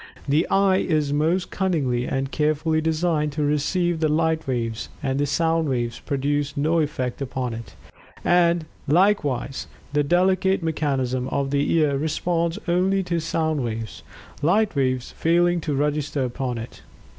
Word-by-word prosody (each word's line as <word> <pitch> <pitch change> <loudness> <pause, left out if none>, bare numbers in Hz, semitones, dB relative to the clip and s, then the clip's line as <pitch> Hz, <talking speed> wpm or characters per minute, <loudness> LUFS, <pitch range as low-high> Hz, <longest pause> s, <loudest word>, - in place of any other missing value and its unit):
The 150 +4 +2
eye 195 -1 +4
is 150 -5 0
most 165 +5 +1
cunningly 140 -10 0
and 135 0 -2
carefully 155 +1 +1
designed 160 -2 0
to 150 0 -1
receive 160 +4 +1
the 155 -1 +2
light 160 0 +1
waves; 115 -3 -2
and 135 +1 0
sound 165 0 +1
waves 120 -2 -2
produce 145 0 -1
no 160 +4 +2
effect 140 -5 -2
upon 130 -2 -3
it. 115 0 -9 0.5
And, 170 -2 +3 0.2
likewise, 150 -6 +1 0.3
the 145 - +3
delicate 185 +4 +2
mechanism 135 -5 -1
of 135 0 -1
the 145 0 +1
ear 150 -4 +2
responds 165 +3 -1
only 190 +3 +2
to 175 -2 -1
sound 160 -3 -1
waves; 110 -4 -5 0.4
light 200 +6 +2
waves 130 -2 0
failing 175 +1 +2
to 150 -3 -2
register 145 -1 0
upon 125 0 -3
it. 115 +1 -8
150 Hz, 145 wpm, -23 LUFS, 135-170 Hz, 0.5 s, eye